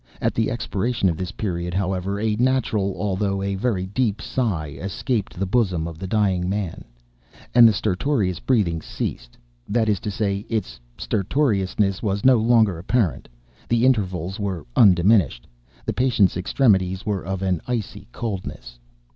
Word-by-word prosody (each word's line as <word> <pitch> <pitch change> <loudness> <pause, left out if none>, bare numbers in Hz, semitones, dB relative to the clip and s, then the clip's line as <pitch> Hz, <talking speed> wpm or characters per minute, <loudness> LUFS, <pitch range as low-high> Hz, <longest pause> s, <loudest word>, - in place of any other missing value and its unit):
At - - 0
the 115 - 0
expiration 115 -3 -1
of 80 - -2
this 90 +1 -4
period, 90 -4 -3
however, 95 +1 -1
a 110 0 0
natural 115 -6 +1
although 100 -1 -1
a 100 0 -1
very 95 -2 -1
deep 105 +2 -1
sigh 95 - -2
escaped 100 +2 -2
the 100 - -1
bosom 95 -6 +1
of 80 -1 -8
the 95 - -5
dying 95 -3 +1
man, 100 -4 -3 0.7
and 120 -1 +8
the - - +6
stertorous 100 - 0
breathing 95 -11 +1
ceased—that - - -4
is 105 -3 +1
to 105 - -4
say, 100 -1 -1
its 105 - -3 0.2
stertorousness 100 -4 0
was 100 -1 -1
no 130 -1 +7
longer 110 -5 +3
apparent; 100 - 0 0.4
the 120 +1 +3
intervals 95 -7 0
were 95 -7 -3
undiminished. 90 - +4 0.4
The - - -1
patient's 120 -7 +2
extremities 95 -1 +1
were 100 -3 -1
of 95 +1 -3
an 90 -4 0
icy 120 -5 -4
coldness. 75 - -6
100 Hz, 145 wpm, -23 LUFS, 90-110 Hz, 0.7 s, and